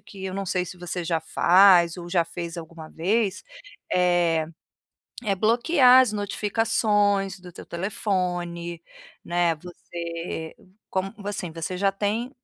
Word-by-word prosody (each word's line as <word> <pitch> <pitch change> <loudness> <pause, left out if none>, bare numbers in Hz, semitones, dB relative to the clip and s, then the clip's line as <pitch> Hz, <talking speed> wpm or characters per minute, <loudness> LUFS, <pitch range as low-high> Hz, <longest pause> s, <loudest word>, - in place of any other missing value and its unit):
que 190 -1 -11
eu 190 - -4
não 195 -1 -3
sei 180 0 0
se 180 0 -10
você 175 0 -4
já 165 -1 0
faz 175 +1 +5
ou 175 0 -8
já 175 -2 +2
fez 170 0 -6
alguma 165 -1 -9
vez, 200 +3 0 0.5
eh, 175 -3 +2 0.8
é 200 -2 +1
bloquear 250 - +5
as 230 -4 -1
notificações 205 -1 +1
do 180 -1 -12
teu - - -11
telefone, 175 -2 -3 0.4
né, 175 -1 +1
você 170 -1 -7 0.4
como 190 +2 -2
assim, 195 -4 -4
você 165 +3 -5
já 195 +1 +2
tem 210 +5 -2
180 Hz, 135 wpm, -25 LUFS, 170-200 Hz, 0.8 s, faz